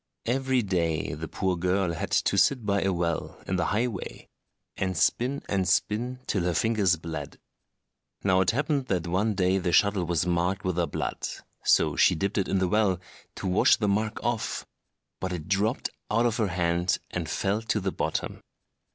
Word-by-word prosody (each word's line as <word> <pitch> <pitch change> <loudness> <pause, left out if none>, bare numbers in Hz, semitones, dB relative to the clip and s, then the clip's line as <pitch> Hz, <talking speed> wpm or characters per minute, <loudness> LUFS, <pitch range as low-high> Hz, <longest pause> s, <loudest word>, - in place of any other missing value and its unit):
Every 130 0 +1
day 85 -7 0
the 80 +2 -5
poor 95 -1 -1
girl 90 0 0
had 80 - -4
to - - +2
sit 125 -5 +3
by 100 -1 +1
a 95 - +1
well, 85 -2 -2
in 95 - -1
the 90 - 0
highway, 110 -1 -3 0.5
and 95 -1 -2
spin 130 +4 +1
and 95 -2 0
spin 120 +6 0
till 100 - 0
her 90 -1 0
fingers 105 -6 +2
bled. 80 -4 -6 0.9
Now 95 -1 +4
it 95 - +2
happened 140 +1 0
that 90 -4 0
one 100 +5 0
day 95 +1 +2
the 90 -1 -1
shuttle 100 -1 +3
was 85 -1 0
marked 90 +2 0
with 90 -2 -1
her 85 -1 +1
blood, - - -3 0.4
so - - +3
she - - +5
dipped 100 +5 -1
it 95 - 0
in 95 - +1
the 95 -1 +2
well, 100 -2 +2 0.4
to - - -7
wash 90 +1 +5
the 105 - -1
mark 105 +2 0
off; 120 -2 -2 0.5
but 95 - -3
it 85 -2 -5
dropped 105 +6 0 0.2
out 115 +3 +2
of 120 -1 +1
her 110 -3 +1
hand 85 0 +1
and - - -3
fell 100 +3 0
to 110 -1 0
the 95 -1 -2
bottom. - - -3
95 Hz, 185 wpm, -27 LUFS, 90-110 Hz, 0.9 s, she